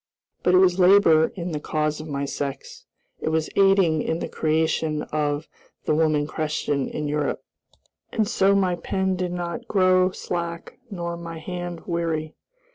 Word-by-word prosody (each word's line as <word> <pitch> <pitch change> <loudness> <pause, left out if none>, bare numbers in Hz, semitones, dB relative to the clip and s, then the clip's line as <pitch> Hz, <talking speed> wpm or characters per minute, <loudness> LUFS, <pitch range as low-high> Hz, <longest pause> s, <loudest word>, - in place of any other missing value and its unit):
But 180 - +3
it - - +7
was 185 0 +4
labor 180 -4 +6
in 175 -2 -4
the 150 - -2
cause 155 0 -1
of 155 - -8
my 140 -1 -2
sex; 140 0 -6 0.3
it - - -2
was 160 0 -1
aiding 195 -5 +4
in 160 - -1
the - - -4
creation 155 -1 0
of 150 0 -2 0.4
"The - - +2
Woman 155 -1 +2
Question 150 -3 -2
in 150 -1 -3
Europe," 150 0 -1 0.7
and 220 -2 0
so 195 0 +3
my 190 -2 +2
pen 190 +2 -1
did 180 -1 -2
not 175 +6 -4
grow 185 -2 +4
slack 170 -2 -5
nor 170 -4 -4
my 170 -1 -7
hand 175 +1 -6
weary. 165 -3 -2
170 Hz, 160 wpm, -24 LUFS, 155-185 Hz, 0.7 s, it